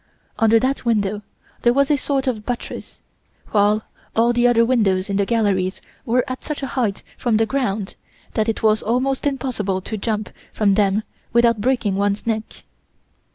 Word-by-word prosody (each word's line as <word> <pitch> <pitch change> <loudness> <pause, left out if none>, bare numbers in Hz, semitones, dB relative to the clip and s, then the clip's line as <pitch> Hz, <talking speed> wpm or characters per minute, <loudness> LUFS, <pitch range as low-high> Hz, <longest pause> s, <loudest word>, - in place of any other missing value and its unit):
Under 225 0 +5
that 260 +4 0
window 210 -3 0 0.4
there 240 +1 +3
was 280 +1 +3
a - - +5
sort 275 -1 -1
of 235 -5 -2
buttress, 245 +1 -6 0.5
while 210 +1 +3 0.3
all 235 +2 +3
the 240 0 +3
other 230 -1 +4
windows 200 -6 +1
in 195 - 0
the 200 -1 +1
galleries 200 -5 +1 0.3
were 245 +2 +3
at 255 -1 -5
such 300 -2 -5
a 270 - -4
height 225 -7 -1 0.2
from 235 -4 +2
the 225 - +3
ground 215 -5 -2 0.4
that 220 +1 +1
it 225 - -2
was 215 0 +4
almost 260 +5 0
impossible 245 -9 -1
to 215 +4 -4
jump 215 0 -2 0.2
from 205 -2 +2
them 205 +1 +2 0.3
without 235 -2 +4
breaking 225 -5 +1
one's 200 +1 0
neck. 220 -1 -3
225 Hz, 170 wpm, -21 LUFS, 205-250 Hz, 0.5 s, Under